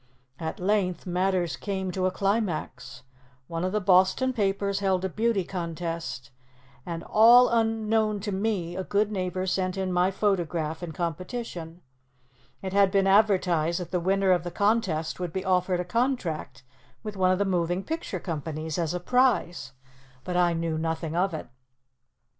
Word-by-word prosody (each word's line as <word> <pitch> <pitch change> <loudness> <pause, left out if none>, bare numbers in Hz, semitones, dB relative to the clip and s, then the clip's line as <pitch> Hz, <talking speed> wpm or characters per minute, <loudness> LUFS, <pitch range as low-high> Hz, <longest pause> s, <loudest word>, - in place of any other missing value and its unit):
At 160 -1 -4
length, 185 -2 0
matters 180 -1 0
came 190 -2 -3
to 185 +1 0
a - - 0
climax. 175 - -2 0.4
One 165 +3 -4
of 185 - 0
the 210 - +1
Boston 190 +7 +3
papers 200 -2 0
held 190 -2 +1
a - - -1
beauty 220 0 0
contest, 165 -6 -5 0.6
and, 170 -1 -4
all 240 +3 +7
unknown 225 -2 +1
to 205 +1 -3
me, 190 -4 -1
a 190 - -3
good 205 +2 0
neighbor 185 -1 -2
sent 185 0 -1
in 190 -1 -1
my 180 +1 +3
photograph 175 -5 -1
in 175 -2 -5
competition. 175 - -5 0.8
It 190 -1 -4
had 200 -1 +5
been 195 0 +2
advertised 185 -5 +3
that 180 - -7
the 180 - +1
winner 190 +2 +2
of 175 -3 +2
the 175 - -4
contest 195 -6 0
would 180 -2 -3
be 190 +3 -4
offered 180 -1 +1
a 180 - -2
contract 180 - -2 0.4
with 210 - -6
one 185 -1 +2
of 185 - +3
the 200 - +1
moving 180 0 0
picture 320 - -4
companies 160 -1 -4
as 170 0 -1
a - - -1
prize, 235 - +1 0.5
but 180 - -4
I 175 -1 +3
knew 165 -1 -2
nothing 160 0 -2
of 190 +3 +1
it. 160 - -6
185 Hz, 165 wpm, -26 LUFS, 170-200 Hz, 0.8 s, all